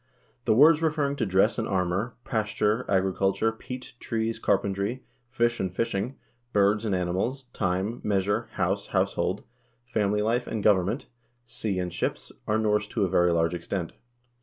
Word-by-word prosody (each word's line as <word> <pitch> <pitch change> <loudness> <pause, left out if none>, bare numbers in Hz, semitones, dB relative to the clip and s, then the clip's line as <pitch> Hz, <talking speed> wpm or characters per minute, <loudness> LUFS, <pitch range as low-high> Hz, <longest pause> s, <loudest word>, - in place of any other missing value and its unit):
The - - +4
words 150 +5 +7
referring 150 -3 +1
to 115 - 0
dress 95 +5 +3
and 110 - -1
armor, 95 +5 -1
pasture, 110 0 0
agriculture, 95 +3 +2
peat, 125 +3 -8
trees, 115 0 -2
carpentry, 100 +5 0 0.3
fish 120 -2 +1
and 95 -2 -1
fishing, 115 +5 -2 0.4
birds 105 +2 +3
and 100 -3 +1
animals, 95 +10 -1
time, 95 +4 -1
measure, 100 0 0
house, - - -1
household, 95 +3 0 0.4
family 105 -3 0
life 120 +3 0
and 110 -3 -3
govern 95 -4 +4
ment, 120 +8 -3 0.4
sea 105 -4 -3
and 90 -1 -2
ships, - - -3 0.2
are 110 - +2
Norse 105 -1 +1
to 105 -4 0
a - - -2
very 90 -1 +3
large 85 0 +2
extent. 85 0 -4
105 Hz, 155 wpm, -27 LUFS, 95-115 Hz, 0.4 s, words